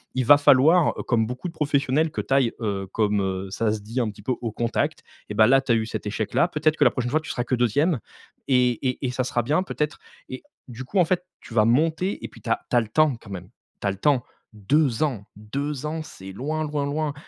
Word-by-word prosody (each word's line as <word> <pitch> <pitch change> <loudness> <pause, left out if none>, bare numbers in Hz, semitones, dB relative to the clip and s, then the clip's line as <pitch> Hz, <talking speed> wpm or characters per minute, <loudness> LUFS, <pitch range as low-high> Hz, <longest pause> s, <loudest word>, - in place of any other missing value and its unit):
Il 130 -1 0
va 145 +4 +8
falloir, 145 +5 +5
heu, - - -4
comme 115 -3 +1
beaucoup 125 +7 -5
de 170 - -8
professionnels, 150 0 +1
que - - -3
tu - - -2
ailles, 135 -4 +3
heu, 100 -3 -2
comme, 105 -2 +1
heu, 95 0 -3
ça 110 +2 0
se 105 -1 -3
dit 115 +5 -4
un 115 -3 0
petit 105 -1 -11
peu, 130 - 0
au 115 -2 -3
contact, 115 +2 -2 0.3
et - - -4
bah, 110 - +6
là 135 +2 +5
tu 135 - -2
as - - +5
eu 110 -1 0
cet 110 - -5
échec-là. 110 - 0
Peut-être 155 -2 +1
que - - +3
la - - +6
prochaine 120 -2 -3
fois 155 - +3
tu 160 - -10
seras 120 - -2
que 125 - -4
2ème 130 - +1 0.5
et 125 -2 +4 0.2
et 125 - -4
et 125 - -1
ça 130 +1 -1
sera 120 -1 -1
bien 150 +9 +1
peut-être. 150 -4 -3 0.3
Et - - -7 0.3
du 125 0 -8
coup 190 +9 0
en 180 - +5
fait 180 +1 -1 0.2
tu - - -12
vas 110 -2 +4
monter, 160 - +1
et - - -3
puis - - -16
tu - - -7
as 115 - +2
tu - - 0
as - - +5
le 110 - -6
temps 150 +4 +3
quand 115 -2 -15
même. 90 -1 -7 0.3
Tu - - -1
as - - +2
le 95 - -7
temps. 130 +3 +2 0.3
2 125 +5 +1
ans! 125 -10 -2
2 140 +7 -4
ans, 160 +1 -3
c’est 95 -10 -11
loin, 150 +10 -3
loin, 150 -2 -2
loin. 150 +1 -2
130 Hz, 265 wpm, -24 LUFS, 110-150 Hz, 0.5 s, va